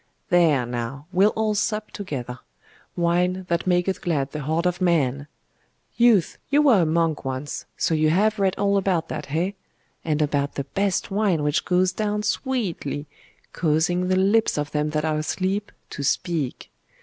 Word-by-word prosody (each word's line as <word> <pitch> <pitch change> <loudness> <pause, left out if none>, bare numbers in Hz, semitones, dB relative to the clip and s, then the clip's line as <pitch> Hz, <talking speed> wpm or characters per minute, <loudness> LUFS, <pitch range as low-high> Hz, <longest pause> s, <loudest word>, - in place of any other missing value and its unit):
'There, 160 -8 +4
now; 120 +4 -5
we'll 190 +3 +4
all 220 -1 +1
sup 215 0 -1
together. 125 -10 -6 0.6
Wine, 180 +2 +1
that 170 +1 0
maketh 180 +1 +1
glad 140 -5 -1
the 150 - -5
heart 160 +5 -1
of 180 +1 0
man! 145 -6 +1 0.7
Youth, 235 -8 +3
you 290 +2 +4
were 245 -10 +5
a - - +3
monk 165 -1 +1
once, 135 +2 -5
so - - +1
you 155 0 +3
have 210 +6 +2
read 195 -1 +2
all 200 0 +2
about 185 -4 0
that, 150 -2 -5
eh? 170 +6 0 0.5
and 155 -2 0
about 145 -2 0
the 140 - -2
best 195 +8 -1
wine 195 -6 +1
which 150 +1 0
goes 180 0 +2
down 210 +2 -2
sweetly, 205 - -2 0.5
causing 175 +3 +1
the 185 - +2
lips 200 +2 +3
of 145 -1 -2
them 150 0 0
that 150 +1 -1
are 155 -1 0
asleep 190 +6 -2 0.2
to - - -5
speak. 150 -1 -2
175 Hz, 165 wpm, -23 LUFS, 150-195 Hz, 0.7 s, were